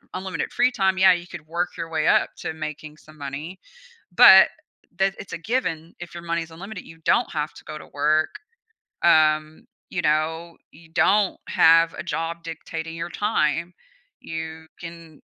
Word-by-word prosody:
unlimited 185 0 -4
free 280 - +3
time. 190 -6 +1
Yeah, 190 0 +7
you 175 -1 -3
could 155 - -10
work 170 +2 -3
your 165 -1 -5
way 155 -1 0
up - - +3
to - - -4
making 155 -1 -7
some 155 +1 -18
money, 145 +6 -7 0.5
but 190 +2 +9 0.5
that 195 0 +2
it's 200 - -9
a - - -3
given, 165 -5 -3
if 175 -1 -9
your 170 0 -8
money 170 0 -1
is 165 - -14
unlimited, 195 +4 -9
you 165 - -14
don't 160 - +1
have 150 -1 -3
to - - -13
go 155 - -7
to - - -12
work, 155 +2 +1 0.7
um, 155 -2 +3 0.2
you 175 - -2
know, 160 +2 -1 0.2
you 160 +2 -18
don't 200 +4 +2
have 165 +1 +5
a - - -6
job 165 0 -4
dictating 165 0 -7
your 165 +1 -5
time, 170 -5 0 0.5
you 160 0 -7
can 165 -3 -11
165 Hz, 170 wpm, -23 LUFS, 155-175 Hz, 0.7 s, but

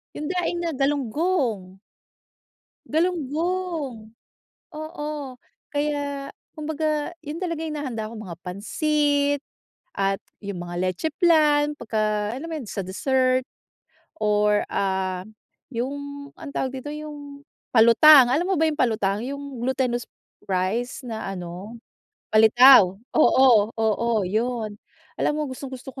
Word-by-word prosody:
'Yong 300 - -4
daing 355 -1 -1
na 335 - -1
galunggong. 270 - -1 1.1
Galunggong, 320 -6 -2 0.6
oo, 310 -1 -6 0.7
kaya 285 -1 -2 0.3
kumbaga, 310 0 -2
yun 295 +3 -5
talaga 335 -3 -2
yung 310 -1 -4
hinahanda 235 -7 -4
ko, - - -9
mga 180 -6 -8
pansit 285 - 0 0.6
at 195 0 0 0.2
yung 200 -3 -5
mga 175 0 -6
leche 185 - -1
flan. 300 -4 +4
Pagka 215 -2 -1
alam 285 +5 -6
mo - - -3
yun, 250 -7 -8
sa 200 - -3
dessert, 255 +6 +1 0.8
or 210 0 +3
ah, 190 -1 -1 0.5
yung 250 +4 -2 0.4
anong 295 -3 -9
tawag 260 - -1
dito, 290 - -7
yung, 290 -2 -9 0.3
palutang, 245 +3 +8
alam 325 +6 +2
mo 385 - +1
ba 320 - +4
yung 300 - -5
palutang, 210 -4 +1
yung 280 -2 -6
glutinous 250 -2 0 0.4
rice 200 +8 -1
na 220 -4 -5
ano, 185 +5 -8 0.6
palitaw? 220 -3 +7 0.2
Oo, 245 -8 +5
oo, 225 +1 +1 0.2
yun. 220 +1 -2 0.4
Alam - - +1
mo - - -1
gustong-gusto 260 0 -8
ko 265 - -9
260 Hz, 120 wpm, -24 LUFS, 215-300 Hz, 1.1 s, palutang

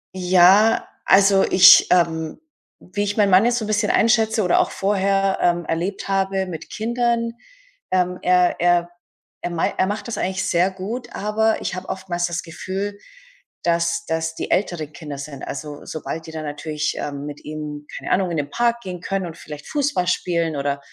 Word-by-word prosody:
Ja, 185 +4 +5 0.2
also, 195 0 +5
ich 185 0 +8
ähm, 165 -3 +1 0.4
wie 195 +3 -5
ich 205 +1 -3
meinen 205 -2 +3
Mann 185 +4 +6
jetzt 240 0 +2
so 230 - -2
'n - - -6
bisschen 210 -1 +1
einschätze 220 -1 +3
oder 180 - +3
auch - - +2
vorher, 195 0 +1
ähm, 175 -1 +1
erlebt 175 +6 -3
habe 195 0 0
mit 170 -4 -8
Kindern, 235 +1 -1 0.6
ähm, 180 -1 +1
er 180 0 +3
er 175 0 +2 0.5
er 175 - -3
mei 170 -1 -1
er 185 - +2
macht 205 +1 -4
das 235 - -4
eigentlich 190 +1 -2
sehr 175 +2 +2
gut, 195 +7 -6
aber 220 +2 0
ich - - -3
habe 185 +1 -7
oftmals 185 -2 -2
das 170 0 -4
Gefühl, 195 +4 -5 0.6
dass 170 0 0
dass 160 0 -2
die - - -5
älteren 165 -6 -1
Kinder 150 -4 -8
sind, 140 -1 -8
also, 145 0 -7
sobald 160 +1 -6
die 160 - -8
dann 155 -1 -6
natürlich, 150 +1 -3
ähm, 145 -1 -5
mit 145 -1 -8
ihm, 150 -1 -7
keine - - -6
Ahnung, 185 -1 +2
in 165 - -2
den 145 -1 -2
Park 235 0 +1
gehen 180 -3 -7
können 195 0 -2
und 165 - -9
vielleicht 150 -1 -10
Fußball 290 -11 0
spielen 170 -3 0
oder 140 0 -1
180 Hz, 185 wpm, -21 LUFS, 160-200 Hz, 0.6 s, ich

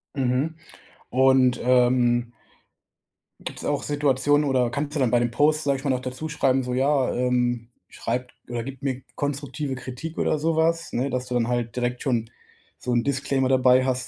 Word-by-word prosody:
Mhm, 135 +3 0 0.6
und, 130 -1 +4
ähm 120 -1 +3 1.1
gibt’s - - -7
auch - - -1
Situationen 145 0 +2
oder 130 -3 +2
kannst 145 +4 -3
du - - 0
dann 130 -4 +2
bei 120 - +4
dem 120 0 0
Post, 150 +5 +2
sage 140 -1 +1
ich - - -11
mal, 145 - -1
noch 130 -1 +1
dazuschreiben: 135 0 -1
„So, 125 0 -3
ja, 135 0 +2
ähm, 125 -1 0 0.2
schreibt 125 +2 -4 0.2
oder 120 -1 -3
gibt 135 +2 -9
mir 135 -2 -2
konstruktive 145 -1 -3
Kritik”, 130 +6 -7
oder - - +1
sowas, 165 +1 +1
ne, 130 +3 0
dass 125 -1 -3
du 125 - -4
dann 120 -2 +1
halt 120 -1 -2
direkt 125 0 -2
schon 120 -5 0 0.5
so 125 - -4
'n 120 -1 +2
Disclaimer 135 -1 0
dabei 130 0 +4
hast, 125 -1 -1
130 Hz, 175 wpm, -24 LUFS, 125-140 Hz, 1.1 s, und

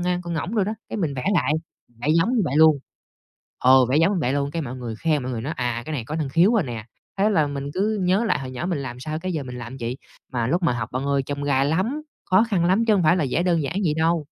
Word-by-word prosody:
ngan, 180 0 0
con 170 -1 -4
ngỗng 170 +6 -3
đồ 210 -4 +2
đó, 210 - -2 0.2
cái, - - -4
mình 160 -8 -1
vẽ 125 - -4
lại, 160 -3 +2 0.5
vẽ 125 - -2
giống 230 +10 +2
như 220 - +3
vậy 145 -2 -1
luôn. 155 -2 +6 0.8
Ờ, 130 0 +6
vẽ 130 +4 +1
giống 175 +4 +3
vậy 130 -4 0
luôn, 140 0 -1
cái, 165 - -2
mọi 130 -4 -5
người 120 -3 -5
khen 150 0 0
mọi 130 - -3
người 115 -2 -3
nói 150 +6 -3
"À, 120 -1 -2
cái 155 - -4
này 130 -6 -3
có 150 - -4
năng 155 -4 -2
khiếu 170 +9 +4
rồi 210 -7 +3
nè." 115 -4 -6 0.3
Thế 205 +2 +3
là 155 -8 +2
mình 140 0 -4
cứ 210 +2 0
nhớ 185 +5 +2
lại 210 - +1
hồi 130 -1 -6
nhỏ 130 +6 -4
mình 175 -4 -1
làm 125 -2 -6
sao, 155 +4 -4
cái, 185 +1 -3
giờ 150 - -2
mình 125 -1 -7
làm 120 +2 -7
vậy, 120 +2 -3 0.3
mà 120 -2 -1
lúc 175 +5 0
mà 165 - +3
học 120 - -3
bạn 130 +2 -2
ơi 140 -1 +1
chông 145 +1 -4
gai 140 -1 +2
lắm, 190 - 0 0.3
khó 190 +4 +6
khăn 175 -5 +2
lắm 190 +6 +3
chứ 220 - +4
hông 190 -4 +2
phải 155 +2 +5
là 155 - +1
vẽ 170 - +1
đơn 170 -3 +2
giản 160 +6 -3
vậy 155 - +2
đâu. 165 -1 +1
155 Hz, 295 wpm, -23 LUFS, 130-180 Hz, 0.8 s, luôn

